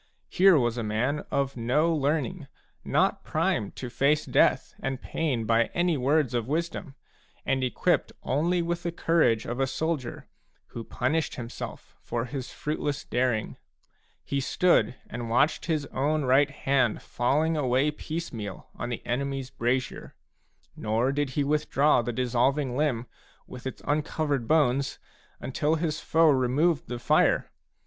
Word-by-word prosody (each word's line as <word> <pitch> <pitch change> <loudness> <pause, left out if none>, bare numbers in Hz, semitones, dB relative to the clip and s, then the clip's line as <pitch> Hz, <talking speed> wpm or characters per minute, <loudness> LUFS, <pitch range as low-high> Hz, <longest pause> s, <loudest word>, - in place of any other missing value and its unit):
Here 190 -2 +6
was 120 -2 +1
a - - -2
,man 120 +8 -1
of 140 -1 -1
no 140 +8 +2
learning, 150 +2 -1 0.4
not - - +1
primed 100 - -1
to 125 - -5
face 145 +4 +2
death - - +2
and 135 -1 -2
pain 135 -9 -2
by 115 +1 +3
any 175 -1 +2
words 140 -1 +1
of 120 -2 -1
wisdom, 160 -1 -3 0.5
and 130 -1 +1
equipped 125 - +1
only 170 +5 +1
with 170 0 -2
the 170 - -2
courage 160 -10 +2
of 120 +2 -4
a 135 - +2
soldier, 155 -3 -3 0.4
who 115 - -6
punished 145 +8 -1
himself 120 -3 -8
for 120 0 -3
his 130 -1 -6
fruitless 150 -1 -3
daring; 125 -3 -1 0.7
he 140 - -2
stood 135 -5 +2
and 120 0 -5
watched 135 +7 +2
his 155 -4 0
own 150 +3 +1
right 135 +3 +4
hand 135 -5 0
falling 150 +7 +1
away 135 0 +2
piecemeal 145 - -6
on 120 - -5
the 120 - -5
enemy's 135 +1 -2
brazier/ 130 0 -2 0.6
nor 115 +5 0
did 145 0 -1
he 145 - +3
withdraw 150 -2 +2
the 120 - -3
dissolving 125 +2 +1
limb, 130 -5 0 0.4
with 125 +1 -8
its 130 - -7
uncovered 145 -4 -1
bones, 140 -3 +2 0.4
until 150 +4 0
his 155 -2 -2
foe 160 0 +4
removed 140 +5 +2
the 120 - -4
fire. 120 - +2
135 Hz, 145 wpm, -27 LUFS, 125-155 Hz, 0.7 s, Here